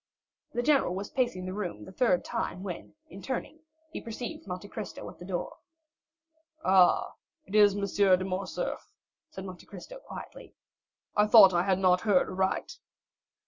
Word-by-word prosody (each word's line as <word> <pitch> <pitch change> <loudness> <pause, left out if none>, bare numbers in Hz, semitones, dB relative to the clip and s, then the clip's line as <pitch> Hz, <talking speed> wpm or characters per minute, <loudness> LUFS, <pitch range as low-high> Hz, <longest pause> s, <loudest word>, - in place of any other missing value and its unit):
The 240 0 -1
general 275 -10 +3
was 200 +2 -5
pacing 240 -9 -1
the 185 - -4
room 175 - -5
the - - -11
third 190 -3 +1
time 185 - -3
when, 185 - -7
in 195 - -11
turning, 265 +6 -5 0.3
he - - -6
perceived 230 -1 -7
Monte 180 +2 -6
Cristo 215 0 -7
at - - -19
the 175 - -9
door. 180 -2 -4 1.1
"Ah, 185 -1 +4 0.3
it 195 - -13
is 205 -2 +6
M. 200 - -3
de 190 -2 +3
Morcerf," 185 0 -4 0.4
said 190 - -8
Monte 185 -2 -10
Cristo - - -10
quietly; - - -11 0.6
"I 210 0 +4
thought 210 -4 +8
I 175 - +3
had 190 0 +1
not 180 -1 +3
heard 205 -5 +3
aright." 190 - -2
195 Hz, 160 wpm, -29 LUFS, 185-215 Hz, 1.1 s, thought